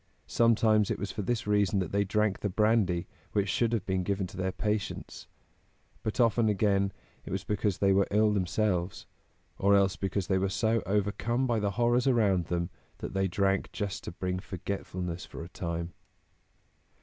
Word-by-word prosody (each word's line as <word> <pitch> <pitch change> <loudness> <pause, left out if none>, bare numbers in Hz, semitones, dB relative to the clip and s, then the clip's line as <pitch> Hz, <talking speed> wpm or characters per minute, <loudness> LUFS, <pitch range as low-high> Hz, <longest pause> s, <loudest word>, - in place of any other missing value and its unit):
Sometimes 110 -2 +3
it - - -1
was 100 - -4
for 105 - -4
this 115 +3 -1
reason 105 -2 +2
that 90 -4 -1
they 100 0 +2
drank 105 0 0
the 100 - -1
brandy 100 -4 +2 0.3
which 100 -2 +1
should 115 +4 +1
have 115 -5 -1
been 95 -1 0
given 95 +1 -1
to 90 - -10
their 95 +1 -1
patients; 105 +1 -3 0.7
but 110 - -3
often, 115 -1 +4
again, 100 -1 +2 0.3
it - - -9
was - - -2
because 105 -2 -1
they 100 -1 +3
were 100 0 +3
ill 105 +1 +3
themselves, 95 -1 0 0.5
or 100 +1 +4
else 100 -1 +3
because 95 -1 -2
they 95 0 +1
were 95 +1 0
so 110 +3 +1
overcome 105 +5 0
by 120 -3 +1
the 105 -1 0
horrors 120 +2 +3
around 100 -9 +3
them 85 +1 -2 0.3
that - - -6
they 95 0 +1
drank 95 +1 0
just 100 -2 -3
to - - -5
bring 90 +1 -3
forgetfulness 90 -2 -5
for - - -8
a 85 - -9
time. 85 -1 -4
100 Hz, 180 wpm, -29 LUFS, 95-110 Hz, 0.7 s, often